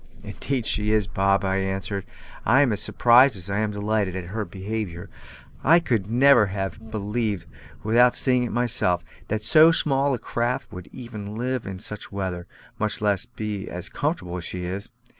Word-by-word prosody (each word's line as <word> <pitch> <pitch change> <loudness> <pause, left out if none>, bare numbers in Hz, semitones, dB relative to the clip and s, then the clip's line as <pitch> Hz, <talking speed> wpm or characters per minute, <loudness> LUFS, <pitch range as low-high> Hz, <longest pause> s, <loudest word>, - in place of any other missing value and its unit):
"Indeed 130 -5 -3
she 105 -1 +1
is, 110 -2 +2
Bob," 100 0 +1
I 95 0 +1
answered; 95 0 -3 0.4
"I 135 +5 +5
am 125 -6 +1
as 105 - -1
surprised 125 0 +5
as 95 +2 -6
I 100 - 0
am 110 0 0
delighted 105 -2 -1
at 90 -1 -6
her 110 -1 -2
behaviour; 95 -3 -5 0.5
I 165 +4 +6
could 115 - -1
never 120 -2 +5
have 95 +3 -5
believed, 105 -3 -2 0.4
without 120 +3 +4
seeing 125 -2 +2
it 120 - -2
myself, 105 -7 +1 0.2
that 105 0 -2
so 155 +8 +7
small 140 -4 +2
a - - -4
craft 120 +2 -2
would 90 0 -9
even 110 -4 -8
live 125 0 -2
in 95 -1 -5
such 105 +2 -7
weather, 95 -3 -4 0.3
much 110 0 0
less 100 -3 +1
be 105 -2 -5
as 90 +2 -6
comfortable 140 - -2
as 90 - -6
she 90 +1 -5
is. 95 +4 -5
105 Hz, 180 wpm, -24 LUFS, 95-120 Hz, 0.5 s, so